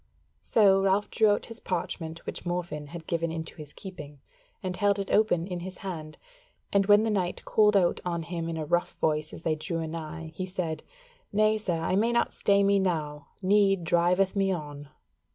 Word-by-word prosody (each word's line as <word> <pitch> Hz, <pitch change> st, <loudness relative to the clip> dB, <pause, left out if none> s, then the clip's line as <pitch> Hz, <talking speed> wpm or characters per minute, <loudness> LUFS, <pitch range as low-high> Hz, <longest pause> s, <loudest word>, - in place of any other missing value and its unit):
So 195 Hz, -3 st, +4 dB
Ralph 195 Hz, +1 st, +1 dB
drew 220 Hz, -2 st, +4 dB
out 205 Hz, -, +1 dB
his 230 Hz, 0 st, -9 dB
parchment 165 Hz, -2 st, -4 dB
which -, -, -5 dB
Morfinn 175 Hz, -4 st, -3 dB
had 165 Hz, +1 st, -9 dB
given 165 Hz, 0 st, -1 dB
into 160 Hz, 0 st, -5 dB
his 150 Hz, -2 st, -8 dB
keeping, 150 Hz, -7 st, -9 dB, 0.4 s
and 185 Hz, -1 st, -2 dB
held 205 Hz, +1 st, +2 dB
it 200 Hz, -1 st, -3 dB
open 205 Hz, -6 st, +3 dB
in 180 Hz, -2 st, -4 dB
his 185 Hz, +1 st, -7 dB
hand, 160 Hz, -5 st, -6 dB, 0.6 s
and 200 Hz, -1 st, +3 dB
when 205 Hz, +1 st, +6 dB
the 225 Hz, -, +1 dB
knight 185 Hz, -3 st, -1 dB
called 210 Hz, -1 st, +4 dB
out 175 Hz, -3 st, +2 dB
on 170 Hz, -2 st, -2 dB
him 165 Hz, 0 st, -4 dB
in 165 Hz, -, -3 dB
a 155 Hz, -, -3 dB
rough 175 Hz, +3 st, 0 dB
voice 155 Hz, -1 st, 0 dB
as -, -, -10 dB
they 160 Hz, -, +1 dB
drew 165 Hz, +2 st, -3 dB
anigh, 160 Hz, 0 st, -5 dB
he 185 Hz, +3 st, -4 dB
said: 175 Hz, -4 st, -3 dB, 0.5 s
"Nay, 215 Hz, +1 st, +3 dB
sir, 185 Hz, -5 st, -1 dB
I 165 Hz, +3 st, 0 dB
may 230 Hz, +3 st, +3 dB
not 235 Hz, -, +1 dB
stay 200 Hz, 0 st, +3 dB
me 200 Hz, 0 st, +4 dB
now, 150 Hz, -6 st, -2 dB, 0.2 s
need 195 Hz, -1 st, +3 dB
driveth 180 Hz, +4 st, +2 dB
me 195 Hz, -1 st, +2 dB
on." 145 Hz, -4 st, -5 dB
180 Hz, 195 wpm, -28 LUFS, 160-200 Hz, 0.6 s, when